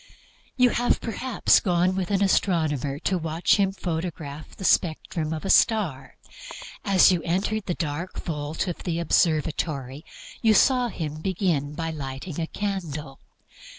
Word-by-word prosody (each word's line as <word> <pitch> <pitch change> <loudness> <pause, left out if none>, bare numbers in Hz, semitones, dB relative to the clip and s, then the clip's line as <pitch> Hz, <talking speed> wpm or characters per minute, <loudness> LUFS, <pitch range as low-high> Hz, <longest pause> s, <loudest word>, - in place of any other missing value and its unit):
You 250 -2 +5
have, 245 0 +1
perhaps, 245 +1 +2
gone 180 0 +1
with 185 -2 -2
an 200 -1 +2
astronomer 155 -8 +1
to 185 +4 -1
watch 160 +4 +1
him 195 -2 +2
photograph 160 -5 -5
the - - -9
spectrum 160 -3 +1
of 160 +3 -4
a 195 - +2
star. 165 - +2 0.7
As 190 -1 +5
you 175 -2 +1
enter 190 +6 -1
the 180 -3 -3
dark 165 +3 -4
vault 155 +1 -3
of 175 - -4
the 170 -3 -2
observatory 155 -4 0 0.4
you 220 -1 +4
saw 250 0 +4
him 155 -7 -5
begin 165 -6 -1
by 165 0 -3
lighting 145 +3 -6
a 160 - -2
candle. 160 -10 -4
170 Hz, 145 wpm, -25 LUFS, 150-195 Hz, 0.7 s, You